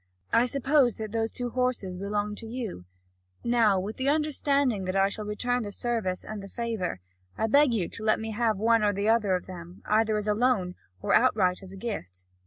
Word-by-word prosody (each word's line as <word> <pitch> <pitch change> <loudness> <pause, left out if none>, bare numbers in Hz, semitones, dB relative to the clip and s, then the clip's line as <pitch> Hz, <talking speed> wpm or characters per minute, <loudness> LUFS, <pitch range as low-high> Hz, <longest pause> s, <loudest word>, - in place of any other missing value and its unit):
I 240 +2 +5
suppose 275 -1 +2
that 215 -2 -6
those 225 0 0
two 245 +1 -4
horses 250 -7 -1
belong 205 +2 -2
to 225 - -8
you 225 - -5 0.6
now, 230 -5 +3
with 200 +4 -5
the 265 +1 0
understanding 280 -7 +1
that 185 +1 -2
I 195 0 +4
shall 210 +1 -5
return 245 +4 -1
the 205 -3 -5
service 215 -5 -2
and 215 -1 -6
the 195 - -8
favour, 215 - -3 0.4
I - - +1
beg 280 +4 +5
you 200 -7 0
to 225 - -8
let 215 0 +3
me 220 0 -4
have 220 -1 +1
one 230 +2 +3
or 205 -1 +2
the 200 +2 0
other 215 -4 +3
of 180 - -4
them, 175 0 -10
either 215 0 +2
as 210 0 -3
a 210 - +3
loan 210 -6 +1 0.3
or - - +1
outright 200 -7 +3
as 190 -1 -10
a 195 - -9
gift." 95 - -6
215 Hz, 210 wpm, -27 LUFS, 195-240 Hz, 0.6 s, I